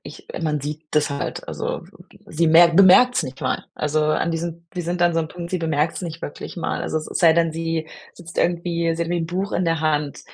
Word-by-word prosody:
ich - - -12 0.2
man 150 -2 0
sieht 150 +3 -5
das 150 -1 +2
halt, 140 - -4
also - - -4 0.4
sie 165 +2 0
merk 165 +1 +6
bemerkt 195 +7 +7
es - - +2
nicht 135 0 -8
mal. - - -2
Also, 150 +1 0
an 155 +2 +1
diesem 170 0 -4
sie 180 - -3
sind 175 +1 -2
an 175 0 +4
so 165 - +2
'm 160 - -4
Punkt, 170 +1 -8
sie 185 - -1
bemerkt 160 -1 0
es - - -5
nicht 165 -1 -6
wirklich 145 - -7
mal. 170 - -2
Also 155 - -1
es 155 - -7
sei 165 -3 +6
denn, 165 0 +2
sie 165 -1 -3 0.3
sitzt 175 0 -10
irgendwie 170 -1 0
sie 170 - -2
hat 170 - -4
wie 175 -1 0
Buch 185 +5 -3
in 180 - 0
der 165 -2 0
Hand 150 -2 -1
165 Hz, 240 wpm, -22 LUFS, 155-175 Hz, 0.4 s, bemerkt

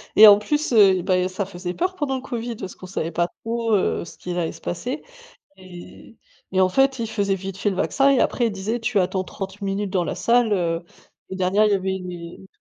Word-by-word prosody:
Et 215 - +10
en 205 -1 +9
plus, 295 +6 -1
heu, 195 -4 +6
bah, 185 +1 +1
il - - +2
y - - 0
a - - -2
ça 190 +2 -3
faisait 180 -1 -6
peur 370 - -1
pendant 290 -6 -2
le 260 - -4
covid 240 -3 -5
parce 190 -4 -8
qu'on - - -11
savait 170 -3 -3
pas 170 +1 0 0.2
trop, 230 0 -1
heu, 195 -3 +1
ce - - -13
qui 180 - -6
allait 175 -2 -1
se - - -14
passer. 250 - -4 0.5
Et 185 +4 -13 0.4
et 190 - +3
en 185 - +4
fait 270 +6 +2
il 225 -1 -2
faisait 200 -3 0
vite 190 0 -7
fait 205 - 0
le 195 - -3
vaccin 275 +8 +2
et 275 -2 +4
après 240 - +1
il - - -2
disait 205 +5 -3
tu 225 -2 0
attends 185 0 0
30 195 +1 -7
minutes 200 +1 -2
dans 185 -3 +1
la - - -3
salle, 230 +4 +2
heu, 170 -3 -1 0.5
et 190 - -5
derrière, 190 +3 +2
il 210 - +2
y - - +4
avait 190 0 -2
une 180 -1 -7
heu, 170 0 -9
une 190 - -15
195 Hz, 260 wpm, -22 LUFS, 185-230 Hz, 0.5 s, Et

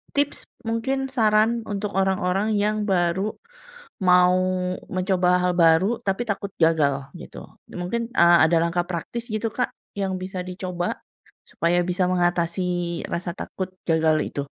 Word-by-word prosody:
tips 285 0 +1 0.2
mungkin 265 +4 -1
saran 225 -1 +2
untuk 205 0 -3
orang-orang 190 +2 +1
yang 210 0 0
baru 190 +2 0 0.7
mau 180 0 +5 0.5
mencoba 185 -1 +1
hal 180 - +2
baru, 170 +7 +4
tapi 195 +5 0
takut 200 0 -3
gagal 140 -4 +2
gitu. - - -10 0.3
Mungkin, 230 +7 -3
eee, 170 -5 +6
ada 165 +1 +3
langkah 175 +1 0
praktis 205 +7 -4
gitu 215 +1 -1
Kak, 250 - -1 0.3
yang 195 -1 -1
bisa 185 0 -4
dicoba? 180 -1 -4 0.5
Supaya 175 +2 +1
bisa 180 +1 0
mengatasi 175 0 0
rasa 175 0 -3
takut 185 -1 -5 0.2
gagal 160 -1 +3 0.2
itu? 140 - -2
185 Hz, 130 wpm, -23 LUFS, 175-210 Hz, 0.7 s, eee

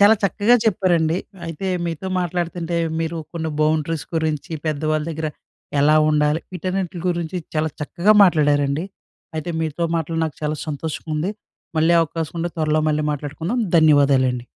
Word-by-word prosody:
చాలా 205 +2 +8
చక్కగా 205 +4 +3
చెప్పారండి. 175 -6 +2 0.3
అయితే 165 +4 -5 0.2
మీతో 165 +2 -4
మాట్లాడతంటే 175 -1 -2 0.2
మీరు 165 +1 -2
కొన్ని 160 -1 -3
బౌండరీస్ 155 0 +1
గురించి, 160 -2 -1 0.2
పెద్దవాళ్ళ 155 0 0
దగ్గర 155 0 -3 0.5
ఎలా 150 +2 +5
ఉండాలి? 150 +1 +2
వీటన్నింటి 185 0 -3
గురించి 175 0 -2 0.2
చాలా 155 0 +1
చక్కగా 175 +7 +2
మాట్లాడారండి. 145 -3 +3 0.5
అయితే 155 +3 -3
మీతో 160 +1 -1
మాట్లాడి 165 0 -2
నాకు 155 - -5
చాలా 150 0 -1
సంతోషంగా 155 +1 -5
ఉంది. 165 +6 -1 0.5
మళ్ళీ 160 +2 +4
అవకాశం 165 0 -3
ఉంటే 175 +1 -2
త్వరలో 155 -1 +1
మళ్ళీ 150 0 0
మాట్లాడుకుందాం. 160 - -3 0.2
ధన్యవాదాలండి. 140 -5 +4
160 Hz, 135 wpm, -21 LUFS, 150-175 Hz, 0.5 s, చాలా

